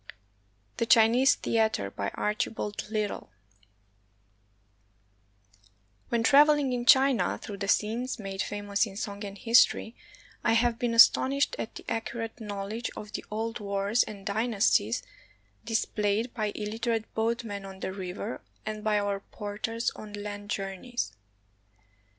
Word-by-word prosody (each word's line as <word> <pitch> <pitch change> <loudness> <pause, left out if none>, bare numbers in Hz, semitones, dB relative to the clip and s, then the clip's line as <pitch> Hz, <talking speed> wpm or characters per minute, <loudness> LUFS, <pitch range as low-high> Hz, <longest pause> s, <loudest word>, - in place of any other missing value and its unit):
THE 230 - 0
CHINESE 235 +4 +6
THEATER 220 - +1
BY 100 0 -3
ARCHIBALD 210 0 -2
LITTLE 215 -2 -2 2.8
When 235 -1 +1
traveling 290 +1 +5
in 245 0 -3
China 270 -2 +5
through 205 - -8
the 200 0 -4
scenes 230 +6 0
made 195 -3 -4
famous 205 +1 -1
in 195 -1 -9
song 205 -1 -5
and 200 0 -7
history, 235 0 +4 0.5
I - - +3
have 230 0 +2
been 235 -1 0
astonished 275 +4 +5
at 220 - -5
the - - -9
accurate 225 0 -4
knowledge 210 +2 -4
of 210 0 -8
the - - -5
old 225 +2 -3
wars 200 +2 +1
and 200 -2 -5
dynasties 220 +1 +1 0.6
displayed 220 0 0
by 215 -3 -1
ilUterate 220 +1 -2
boatmen 225 -3 -2
on 190 0 -10
the 190 - -3
river 190 +3 -5 0.2
and 215 -1 -4
by 215 -1 +2
our 205 -1 -1
porters 215 +3 -4
on 210 -1 -10
land 205 0 -6
journeys. 195 - -3
215 Hz, 125 wpm, -28 LUFS, 205-230 Hz, 2.8 s, CHINESE